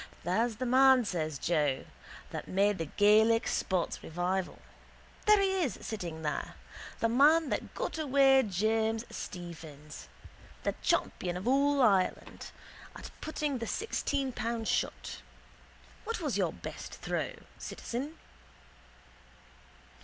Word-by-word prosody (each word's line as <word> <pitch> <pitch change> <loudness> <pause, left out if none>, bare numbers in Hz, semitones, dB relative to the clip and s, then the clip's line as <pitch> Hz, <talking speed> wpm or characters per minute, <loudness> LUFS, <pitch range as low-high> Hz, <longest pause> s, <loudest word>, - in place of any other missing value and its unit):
—There's 220 +6 +1
the 255 - -3
man, 260 0 +6
says 155 -6 -2
Joe, 150 -3 0 0.5
that - - -5
made 200 +1 +2
the 165 - -1
Gaelic 220 +5 +4
sports 185 -3 -1
revival. 180 +3 -2 0.7
There 425 -1 +7
he 385 -1 +2
is 285 -8 -1
sitting 170 -7 -5
there. 150 - -3 0.5
The 230 - +4
man 290 +6 +5
that - - -3
got - - -3
away 270 -2 +5
James 220 +2 0
Stephens. 160 -5 -8 0.5
The - - 0
champion 175 -1 0
of 190 +6 -6
all 280 +1 +3
Ireland 195 -5 +1 0.5
at - - -9
putting 300 -4 -2
the 230 - -4
sixteen 285 - -1
pound 230 -2 -3
shot. - - -2 0.8
What 455 +1 -3
was - - -2
your - - +1
best - - -8
throw, - - -3 0.3
citizen? 280 +7 -5
225 Hz, 120 wpm, -31 LUFS, 180-270 Hz, 0.8 s, There